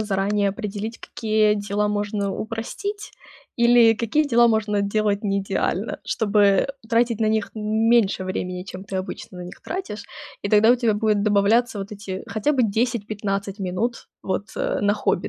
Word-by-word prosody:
заранее 200 0 +1
определить, 210 +1 -5
какие 215 -2 +1
дела 205 0 -1
можно 205 -1 -1
упростить 315 - -5 0.5
или 235 -1 +6
какие 230 +7 +1
дела 240 -3 +4
можно 210 -2 +1
делать 205 0 0
неидеально, 195 0 -1
чтобы 205 0 +2 0.2
тратить 230 -1 +2
на 220 - +2
них 215 -1 0
меньше 220 -2 +2
времени, 180 -1 -3
чем 190 0 -9
ты 195 -1 -5
обычно 185 0 -6
на - - -6
них 180 - -11
тратишь. 330 - -5 0.4
И 200 - -2
тогда 215 +2 +5
у 250 - +5
тебя 235 -3 +1
будет 210 -1 +1
добавляться 215 +3 +2
вот 195 0 -6
эти 200 -2 -6
хотя 220 +7 0
бы 260 -4 +2
10-15 210 -3 -1
минут, 195 +6 -2 0.2
вот, 195 +3 -3
э, - - -1
на 205 0 +2
хобби 205 -4 -1
210 Hz, 155 wpm, -23 LUFS, 200-225 Hz, 0.5 s, или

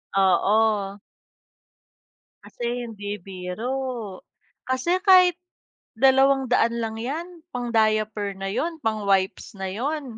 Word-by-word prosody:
Oo. 200 +1 +2 1.4
Kasi 240 0 -4
hindi 205 -2 -6
biro. 210 +4 -5 0.5
Kasi 300 +9 +1
kahit 365 -3 +6 0.6
200 265 -2 +3
lang 220 0 -3
yan, 325 +7 -5
pang-diaper 215 -4 0
na 195 0 -4
yun, 325 +7 -2
pang 215 -2 -1
wipes 190 +1 0
na 190 - -3
yun. 285 +8 -2
225 Hz, 95 wpm, -24 LUFS, 205-270 Hz, 1.4 s, kahit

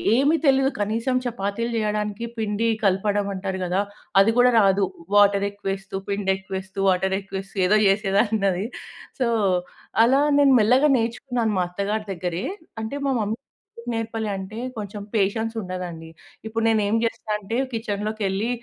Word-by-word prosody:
ఏమి 290 +5 +3
తెలియదు 270 0 +4
కనీసం 230 +5 0
చపాతీలు 230 0 -2
చేయడానికి 210 +1 -1
పిండి 220 +1 0
కలపడం 200 +1 +1
అంటారు 190 0 -3
కదా! 185 +3 +1 0.4
అది 225 +3 +3
కూడా 250 0 +6
రాదు. 195 -1 +4 0.3
వాటర్ 200 0 +5
ఎక్కువ 200 -1 -10
వేస్తూ, 195 0 -8
పిండి 200 -1 0
ఎక్కువ 190 0 -7
వేస్తూ, 190 +1 -9
వాటర్ 190 +1 +1
ఎక్కువ 195 0 -7
వేస్తూ 195 +1 -11
ఏదో 210 +3 +5
చేసేదాన్నది. 200 -1 +1 0.5
సో 250 - +2 0.8
అలా 270 +3 +4 0.2
నేను 275 -2 +6
మెల్లగా 255 +7 +4
నేర్చుకున్నాను 235 -1 -1
మా - - +3
అత్తగారి 205 +3 -2
దగ్గరే. 175 0 -3 0.4
అంటే 220 +6 -4
మా 275 - +2
మమ్మీ 215 +2 -1 0.6
నేర్పలే 225 -1 -3
అంటే 190 +3 -7 0.2
కొంచెం 205 0 -6
పేషెన్స్ 220 +3 +1
ఉండదండి. 180 -3 -6 0.4
ఇప్పుడు 225 +1 -2
నేను 220 -1 +3
ఏమి 225 +2 +2
చేస్తా 225 -1 -3
అంటే 210 +2 -5 0.2
కిచెన్‌లోకి 215 -1 -3
వెళ్లి 195 +5 -1
210 Hz, 150 wpm, -23 LUFS, 195-225 Hz, 0.8 s, కూడా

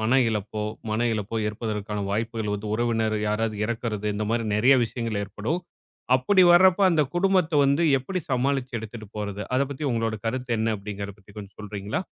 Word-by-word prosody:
பண 110 +1 0 0.2
இழப்போ, 105 -1 -3 0.3
மன 110 +3 +1
இழப்போ 110 +1 -2
ஏற்பதற்கான 105 -1 -3
வாய்ப்புகள் 110 0 -2
வந்து 105 +1 -5
உறவினர் 115 -1 0
யாராவது 110 0 -1
இறக்கறது 110 -2 -3
இந்த 105 +1 -2
மாரி 115 -1 0
நெறைய 125 +6 +5
விஷயங்கள் 115 -3 -3
ஏற்படும். 110 - -3 0.6
அப்படி 185 +9 +4
வரப்ப 185 +1 +6
அந்த 160 -3 +3
குடும்பத்த 185 -2 +2
வந்து, 140 +4 +3 0.2
எப்படி 185 +9 -3
சமாளிச்சு 130 0 0
எடுத்துட்டு 110 0 -8
போறது? 100 -1 -4
அத 130 - +3
பத்தி 140 +2 -5
உங்களோட 115 -2 0
கருத்து 125 +2 -3
என்ன 110 +1 +1
அப்படிங்கிறத 100 0 -6
பத்தி 100 0 -19
கொஞ்சம் 100 -2 -9
சொல்றீங்களா? 105 - -4
110 Hz, 165 wpm, -25 LUFS, 105-130 Hz, 0.6 s, வரப்ப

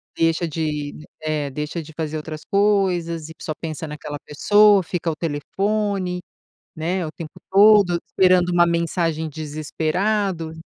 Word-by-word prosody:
deixa 165 +1 +1
de 150 -2 -3 0.3
é, 155 -2 -2
deixa 150 +4 -4
de 160 0 -12
fazer 155 -1 -3
outras 155 0 -7
coisas 180 -6 +1
e - - -9
só 155 - -3
pensa 160 -1 -5
naquela 150 -1 -7
pessoa, 205 +7 +4
fica 170 0 -3
ao 155 - -2
telefone, 185 +4 -1 0.5
né, 175 +3 -1
o 155 - -5
tempo 160 -1 -8 0.2
todo, 200 -3 +6 0.2
esperando 185 -1 +5
uma 175 -1 +4
mensagem, 165 -1 0
desesperado. 160 +4 -2
165 Hz, 135 wpm, -22 LUFS, 155-185 Hz, 0.5 s, todo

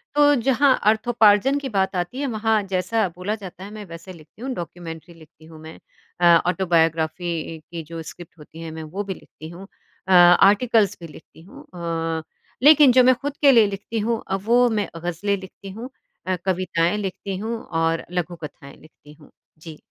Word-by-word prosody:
तो 290 0 +5
जहाँ 265 +2 +3
अर्थोपार्जन 220 +3 +3
की 270 -2 -5
बात 190 -2 -1
आती 180 +9 -3
है, 285 - -1
वहाँ 220 -2 0
जैसा 190 +3 0
बोला 195 +4 -3
जाता 190 -3 -11
है, 205 - -9
मैं 210 -1 -9
वैसे 170 +3 -10
लिखती 160 +6 -18
हूँ, 260 0 -4
डॉक्यूमेंट्री 170 -1 -8
लिखती 160 -1 -19
हूँ 160 -1 -14
मैं। 160 0 -11 0.4
अ, 170 -1 +6
ऑटोबायोग्राफ़ी 165 -2 0
की 165 -2 -6
जो 165 +1 -8
स्क्रिप्ट 165 +1 -12
होती 160 +2 -13
है, 165 -1 -7
मैं 160 0 -7
वो 190 +7 -5
भी 195 -1 -5
लिखती 160 -2 -13
हूँ 185 +3 -11 0.4
अ, - - -2
आर्टिकल्स 200 +4 +5
भी 165 - -8
लिखती 160 +1 -16
हूँ। 275 - -15
अ, 165 -2 -3 0.4
लेकिन 295 -3 +7
जो 255 0 +5
मैं 255 0 +5
खुद 285 +3 -6
के 280 -1 +7
लिए 225 -4 +5
लिखती 205 +3 -5
हूँ 225 +1 -1
अ, 195 - -1
वो 235 +5 +3
मैं 210 -2 -1 0.2
गज़लें 180 +4 -1
लिखती 190 +1 -12
हूँ 235 +6 -8 0.4
अ, 185 - +1
कविताएँ 185 0 0
लिखती 195 -1 -5
हूँ 225 +3 -4
और 165 0 -1
लघुकथाएँ 165 -5 -6
लिखती 150 -1 -18
हूँ। 150 -1 -20 0.3
जी। 160 -2 -11
185 Hz, 185 wpm, -22 LUFS, 165-220 Hz, 0.4 s, लेकिन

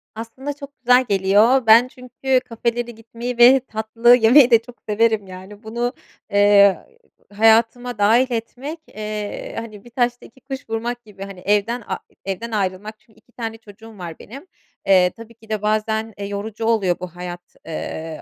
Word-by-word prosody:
Aslında 245 +6 -6
çok 280 -1 -11
güzel 250 +1 +5
geliyor. 205 +6 +3
Ben 230 +3 +7
çünkü 255 +1 -1
kafelere 235 +1 -3
gitmeyi 235 +2 -7
ve 250 +3 +7
tatlı 225 +2 +3
yemeyi 245 +2 +6
de 230 - +7
çok 245 +1 -14
severim. 215 -1 +1
Yani, 190 +3 -11
bunu, 240 +3 -3 0.4
eee, 200 -1 +6 0.6
ııı, 205 - -17
hayatıma 230 +2 +3
dâhil 230 +5 +3
etmek, 250 +7 -5
eee, 210 -1 -6
hani, 215 -3 -10
bir 240 - -15
taşla, 240 0 0
iki 265 - -24
kuş 270 -1 -8
vurmak 240 +2 -3
gibi. 195 -2 -11
Hani, 195 -2 -9
evden 210 +5 0
a - - -2 0.3
evden 195 +5 -4
ayrılmak 210 +1 -3
çünkü 220 0 -28
2 245 - -32
tane 225 -2 -6
çocuğum 220 0 -15
var 170 -3 -8
benim. 275 - -12 0.4
Eee, 185 -2 +5
tabii 230 0 -12
ki 220 -1 -21
de 215 -2 -2
bazen, 220 +1 -1
eee, 200 - -5
yorucu 205 +2 -5
oluyor 200 -7 +1
bu 180 - -5
hayat, 175 0 -9
eee, 160 0 -6
225 Hz, 170 wpm, -20 LUFS, 205-240 Hz, 0.6 s, Ben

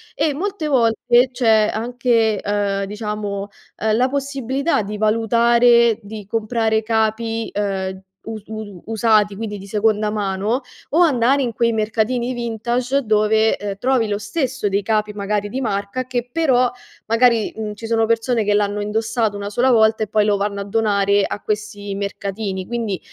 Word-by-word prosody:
E 305 - +1
molte 370 +1 -3
volte 240 0 +3
c'è 225 -4 +3
anche, 230 -2 +1
ehm, 200 -1 -1
diciamo, 210 -1 -4 0.3
ehm, 220 0 0
la 250 +2 +3
possibilità 275 0 -1
di 210 +1 -5
valutare, 235 +1 +4
di 210 0 -9
comprare 220 +1 0
capi, 225 0 -1
ehm, 190 -2 -3 0.2
us 220 -1 -6
usu 215 -4 -8
usati, 215 -2 +2
quindi 210 -1 -5
di 195 - -10
seconda 210 +1 +1
mano 210 +3 -1 0.3
o 310 - 0
andare 275 -3 +3
in 240 -2 -2
quei 230 +1 +1
mercatini 225 +3 0
vintage 240 +3 -1
dove, 220 +1 +3
ehm, 200 -1 -5
trovi 250 0 +1
lo 205 -1 -1
stesso 255 +3 -2
dei 200 +1 0
capi 215 0 0
magari 205 0 -2
di 255 +6 -4
marca 205 +2 -2
che 245 -1 -3
però 255 -5 +2 0.3
magari, 230 0 +2
mhmm, 215 -1 -5
ci 225 - -9
sono 225 0 +1
persone 230 0 +1
che 205 0 +2
l'hanno 205 0 0
indossato 220 0 -1
1 200 0 -5
sola 245 +5 +2
volta 220 -1 +4
e - - -3
poi 210 +1 +2
lo 205 -1 +2
vanno 200 0 -2
a - - -3
donare 200 -1 +2
a - - -3
questi 210 -1 -4
mercatini. 200 -1 -4
Quindi 225 -5 -3
220 Hz, 160 wpm, -20 LUFS, 205-235 Hz, 0.3 s, valutare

